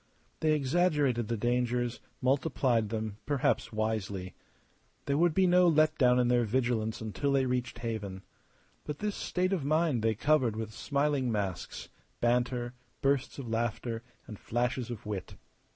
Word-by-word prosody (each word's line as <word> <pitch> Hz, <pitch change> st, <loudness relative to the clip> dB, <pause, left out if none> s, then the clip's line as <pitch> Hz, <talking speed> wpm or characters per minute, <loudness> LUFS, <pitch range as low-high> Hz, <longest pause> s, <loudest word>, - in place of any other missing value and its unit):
They 155 Hz, -1 st, +3 dB
exaggerated 145 Hz, -5 st, +2 dB
the 115 Hz, -, -1 dB
dangers, 120 Hz, +1 st, 0 dB, 0.2 s
multiplied 130 Hz, -4 st, +2 dB
them; 110 Hz, -2 st, -3 dB
perhaps 140 Hz, -3 st, +1 dB
wisely. 105 Hz, -4 st, -2 dB, 0.7 s
There 140 Hz, -, +1 dB
would 170 Hz, +1 st, +3 dB
be 190 Hz, -, +4 dB
no 180 Hz, 0 st, +5 dB
let 155 Hz, -1 st, +4 dB
down 125 Hz, -2 st, +5 dB
in 125 Hz, -, +3 dB
their 120 Hz, 0 st, +3 dB
vigilance 115 Hz, -1 st, 0 dB
until 110 Hz, +6 st, -1 dB
they 135 Hz, -1 st, +3 dB
reached 125 Hz, -1 st, -2 dB
haven. 110 Hz, -5 st, -4 dB, 0.6 s
But 150 Hz, -1 st, -5 dB
this 210 Hz, +3 st, -2 dB
state 185 Hz, +1 st, -1 dB
of 175 Hz, -7 st, -1 dB
mind 155 Hz, -3 st, +2 dB
they 110 Hz, 0 st, +1 dB
covered 130 Hz, -2 st, +2 dB
with 110 Hz, 0 st, -5 dB
smiling 140 Hz, -1 st, 0 dB
masks, 100 Hz, -5 st, -3 dB, 0.3 s
banter, 120 Hz, 0 st, +1 dB, 0.3 s
bursts 140 Hz, -1 st, +1 dB
of 135 Hz, -4 st, -6 dB
laughter, 115 Hz, 0 st, -2 dB, 0.2 s
and 105 Hz, -, -9 dB
flashes 120 Hz, +1 st, -1 dB
of 115 Hz, -4 st, -7 dB
wit. 100 Hz, -5 st, -5 dB
125 Hz, 150 wpm, -30 LUFS, 110-145 Hz, 0.7 s, no